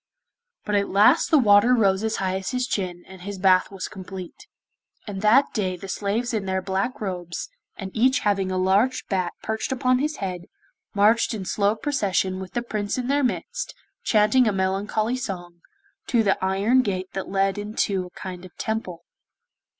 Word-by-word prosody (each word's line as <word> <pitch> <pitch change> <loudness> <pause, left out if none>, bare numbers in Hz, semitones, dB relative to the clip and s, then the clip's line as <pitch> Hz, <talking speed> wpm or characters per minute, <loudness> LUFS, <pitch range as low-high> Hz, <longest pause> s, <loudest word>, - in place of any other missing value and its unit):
But 210 - -2
at 200 -1 +2
last 215 - +5
the 315 - +5
water 225 0 +5
rose 195 -3 +2
as 220 - 0
high 190 -1 -1
as 190 0 -3
his 250 -1 -1
chin, 180 -7 -3
and 190 -1 -12
his 200 +1 -6
bath 185 -1 +4
was 195 -2 -5
complete. 190 - -9 0.6
And 195 -3 -5
that 230 +7 +4
day 185 -4 -1
the 195 - -9
slaves 215 +6 -2
in 210 -3 -1
their 190 0 0
black 190 +6 -2
robes, 180 - -4 0.3
and 190 -2 -6
each 255 +3 +3
having 195 -2 +1
a 185 - -1
large 195 +7 +2
bat 185 -3 0
perched 220 +3 -2
upon 255 0 +2
his 305 +2 -1
head, 180 -5 -5 0.5
marched 220 +3 +3
in 195 -3 -5
slow 200 +3 +1
procession 200 -8 0
with 190 0 -8
the 240 - -1
Prince 210 -2 -3
in 250 0 -3
their 285 +1 +2
midst, 250 - -3 0.3
chanting 215 +3 +4
a - - +3
melancholy 205 +5 0
song, 175 -7 -6 0.5
to 235 -3 +3
the 195 -2 +1
iron 200 +7 +3
gate 185 -5 -3
that 190 - -4
led 195 +1 +1
into 205 -3 -1
a 180 - -15
kind 185 -1 -7
of 185 - -14
Temple. 185 -6 -4
200 Hz, 180 wpm, -24 LUFS, 190-225 Hz, 0.6 s, last